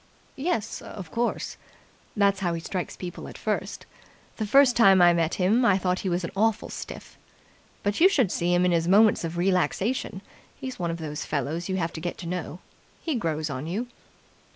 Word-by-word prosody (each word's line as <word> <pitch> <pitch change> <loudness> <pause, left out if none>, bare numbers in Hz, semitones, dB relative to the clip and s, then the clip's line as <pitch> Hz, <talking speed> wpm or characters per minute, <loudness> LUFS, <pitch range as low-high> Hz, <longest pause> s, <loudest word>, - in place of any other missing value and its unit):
"Yes, 250 - -1
of 180 -6 -9
course, 240 +1 -2 0.6
that's 200 -1 +3
how 175 -3 0
he - - -3
strikes 180 +2 -4
people 180 -1 -7
at - - -10
first. - - -3 0.5
The 215 - -2
first 265 +2 +5
time 195 -5 +6
I 175 -1 +7
met 165 -1 +1
him, 205 +7 +2
I 200 -5 +4
thought 185 -1 0
he 190 - -2
was 175 +1 -1
an 170 - -4
awful 220 +2 +1
stiff. - - -9 0.6
But 205 +7 -1
you 375 - +8
should 255 - +2
see 175 0 0
him 175 0 +3
in 180 - +3
his 165 -1 +1
moments 205 +1 +5
of 165 +1 -4
relaxation. 190 +4 0 0.4
He's 260 -5 -6
one 170 -1 -1
of 165 - -3
those 150 -2 -5
fellows 155 +5 -3
you 190 - 0
have 165 -2 -2
to 160 - -6
get 175 +1 -4
to 175 - -8
know. 175 0 -5 0.4
He 325 - -1
grows 160 - -2
on 130 +3 -5
you." 220 +8 -3
185 Hz, 200 wpm, -26 LUFS, 170-215 Hz, 0.6 s, you